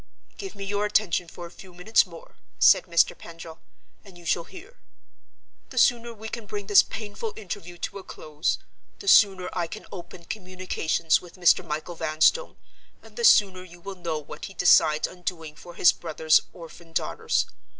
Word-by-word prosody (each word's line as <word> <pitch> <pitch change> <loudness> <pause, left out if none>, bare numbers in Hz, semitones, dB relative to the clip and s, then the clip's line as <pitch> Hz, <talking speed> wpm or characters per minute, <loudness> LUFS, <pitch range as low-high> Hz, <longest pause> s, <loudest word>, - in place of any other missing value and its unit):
"Give 390 -1 -8
me 200 - -7
your 205 +1 -1
attention 195 -4 +1
for 175 +1 -10
a 170 - -11
few 180 0 -14
minutes 195 +3 +3
more," 170 -2 -14 0.2
said - - +5
Mr. 170 -1 +2
Pendril, 165 -1 -11 0.4
"and 195 -4 -15
you 175 - -15
shall 170 0 0
hear. 470 +7 -14 0.9
The - - -12
sooner 235 -2 +3
we 220 -1 -9
can 220 -1 -7
bring 205 0 -5
this 205 0 +7
painful 215 0 -6
interview 185 -4 -8
to 200 +3 -5
a - - -11
close, 155 -1 -3 0.4
the 400 - -11
sooner 195 - +5
I 175 -2 -2
can 215 - -9
open 175 -2 -10
communications 185 -4 -1
with 175 - -14
Mr. 180 -2 +4
Michael 155 +3 -5
Vanstone, 160 - +1 0.5
and - - -17
the 475 - -5
sooner 195 - +5
you 175 -1 -15
will 195 +3 -7
know 170 -4 -4
what 150 0 -8
he 195 - -11
decides 155 -3 +4
on 180 - -14
doing 165 -4 -5
for 175 +3 -13
his 175 - +6
brother's 160 -1 +2
orphan 165 0 -13
daughters. - - 0
180 Hz, 180 wpm, -25 LUFS, 165-205 Hz, 0.9 s, this